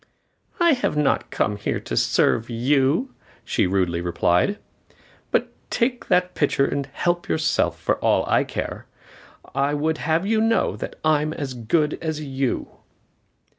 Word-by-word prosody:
"I 340 -2 +5
have 250 - -1
not 150 -1 +1
come 105 -1 -1
here 100 - -2
to - - -5
serve 115 - +2
you," 135 - +1 0.3
she - - +1
rudely 90 -3 0
replied, 85 - +1 0.7
"but - - 0 0.2
take 245 +1 -1
the 180 0 +3
pitcher 140 -2 +2
and 140 -1 -2
help 175 +5 -1
yourself, 155 0 +1
for - - 0
all - - +2
I - - +3
care. - - -5 0.7
I 140 +2 +1
would 155 +2 0
have 160 +4 0
you 220 +1 +2
know 225 +1 +2
that - - -6
I 155 -1 +4
am 155 +1 -2
as 140 -4 -4
good 150 +6 0
as 160 -2 -2
you." 135 -3 -2
150 Hz, 150 wpm, -23 LUFS, 125-170 Hz, 0.7 s, I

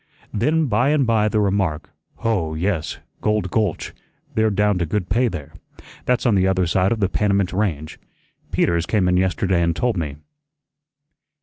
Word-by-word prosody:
Then 155 +9 +1
by 125 +2 +2
and 145 -3 +3
by 110 -2 +2
the 105 - +1
remark, 100 -6 0 0.2
"Hoh, 95 -9 -1
yes, 80 -2 -2 0.2
Gold 105 -4 0
Gulch, 105 -7 -1 0.4
they're 110 0 +2
down 105 -2 +1
to 85 - 0
good 95 +2 -2
pay 125 +2 +2
there. 75 -8 -6 0.5
That's 125 0 +1
on 120 - +4
the 95 -1 +3
other 95 -1 +2
side 90 +3 +1
of 115 - 0
the 95 - +3
Panamint 100 -1 0
Range. 85 -7 -2 0.5
Peters 85 0 +1
came 100 -4 +1
in 90 0 +3
yesterday 95 -1 +1
and 85 -1 +1
told 120 +1 0
me." 75 -4 -3
100 Hz, 170 wpm, -21 LUFS, 90-110 Hz, 0.5 s, on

